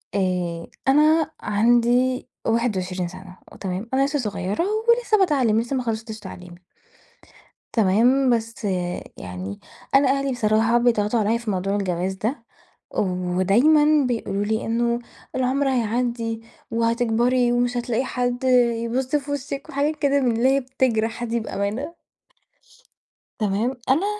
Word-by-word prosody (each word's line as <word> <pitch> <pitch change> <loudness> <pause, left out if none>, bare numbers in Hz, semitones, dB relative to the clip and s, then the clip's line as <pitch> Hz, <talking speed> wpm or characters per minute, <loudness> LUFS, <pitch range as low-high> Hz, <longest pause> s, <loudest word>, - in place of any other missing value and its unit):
آآ 180 -3 -1 0.2
أنا 310 +3 +4
عندي 240 +4 +2 0.2
21 190 -6 0
سنة 185 +1 -11 0.2
تمام؟ 190 +4 -4
أنا 270 +1 +3
لسه 290 0 -1
صغيّرة 205 - -2 0.3
ولسه 470 -2 +4
باتعلم، 270 - +3
لسه 240 +4 -3
ما 255 - -1
خلصتش 220 -1 -4
تعليمي. 180 -2 -11 1.1
تمام؟ 235 +6 +3
بس 230 -1 -1 0.5
يعني 90 +2 -7 0.4
أنا 275 -1 +5
أهلي 275 0 +1
بصراحة 225 0 +2
بيضغطوا 230 -2 +2
عليَّ 220 +2 +1
في 235 -3 -3
موضوع 195 +1 -1
الجواز 185 -1 -1
ده، 225 +5 -3 0.5
ودايمًا 210 - +3
بيقولوا 205 -4 -2
لي 220 +1 -1
إنه 235 +1 0 0.4
العمر 265 +2 +1
هيعدّي، 235 -2 -1 0.3
وهتكبري، 235 +2 +2
ومش 245 0 +1
هتلاقي 240 +1 -1
حد 245 0 -2 0.4
يبُص 255 +4 -1
في 285 0 -2
وشِك، 280 0 -5
وحاجات 290 +3 0
كده 280 -1 +2
من 245 -3 +2
اللي 250 +3 +3
هي - - +3
بتجرح 240 -3 -1
دي 235 0 -1
بأمانة. 220 - -4 1.4
تمام؟ 215 +5 0
أنا 315 +10 +3
235 Hz, 125 wpm, -23 LUFS, 205-260 Hz, 1.4 s, أنا